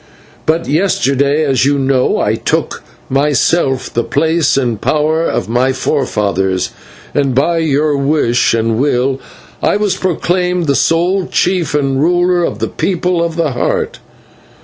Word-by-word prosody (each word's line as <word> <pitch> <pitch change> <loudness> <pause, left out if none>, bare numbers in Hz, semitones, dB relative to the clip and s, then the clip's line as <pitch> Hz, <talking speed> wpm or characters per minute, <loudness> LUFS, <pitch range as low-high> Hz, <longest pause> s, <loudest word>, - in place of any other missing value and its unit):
But 165 +2 +1
yesterday, 145 -3 +1
as 135 -3 +1
you 140 +1 +2
know, 135 -1 +1
I - - +1
took - - -1
upon 135 +2 -4
myself 145 -1 +1
the 120 - 0
place 160 +2 +1
and 120 -5 -1
power 155 +2 +1
of - - -2
my 125 +3 +1
forefathers, 100 - -1 0.4
and 135 -3 0
by 165 +5 +2
your 150 -1 +1
wish 140 -5 +1
and 115 0 0
will 135 -1 0 0.4
I - - +2
was 210 -2 0
proclaimed 180 0 -1
the 140 - +2
sole 175 +6 +1
chief 180 -4 0
and 135 -2 0
ruler 175 +2 +2
of 105 - -2
the 115 0 -2
People 180 - -1
of 165 -1 -3
the 165 -4 0
Heart. 120 - -2
145 Hz, 150 wpm, -14 LUFS, 130-170 Hz, 0.4 s, you